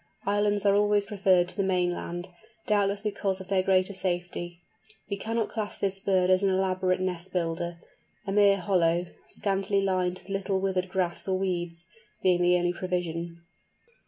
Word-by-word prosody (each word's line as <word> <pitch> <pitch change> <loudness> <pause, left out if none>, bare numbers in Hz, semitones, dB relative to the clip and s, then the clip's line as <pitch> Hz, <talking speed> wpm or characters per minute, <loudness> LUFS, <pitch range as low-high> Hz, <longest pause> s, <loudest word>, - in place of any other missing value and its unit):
Islands 205 0 +1
are 200 - +5
always 205 0 +3
preferred 190 -4 +3
to - - -5
the 200 - 0
mainland, 175 -2 -1 0.4
doubtless 205 -1 +1
because 200 -2 -1
of 190 0 -10
their 195 -1 +3
greater 185 +1 +2
safety. 175 -2 -3 0.5
We - - +1
cannot 225 +2 -2
class 215 -2 -4
this 195 -1 -1
bird 185 -2 +2
as 185 0 +4
an 200 - +3
elaborate 185 -1 +1
nest 185 0 -3
builder, 170 -1 -2 0.5
a 195 - -3
mere 200 -1 +5
hollow, 175 -3 +2 0.2
scantily 195 0 0
lined 185 -2 0
with 185 +1 -16
a - - -3
little 195 0 0
withered 190 -1 -1
grass 180 -1 -2
or 190 -1 +1
weeds, 175 -3 -3 0.4
being 180 -1 +3
the 180 0 +4
only 175 0 0
provision. 170 -2 -3
185 Hz, 165 wpm, -27 LUFS, 175-195 Hz, 0.5 s, are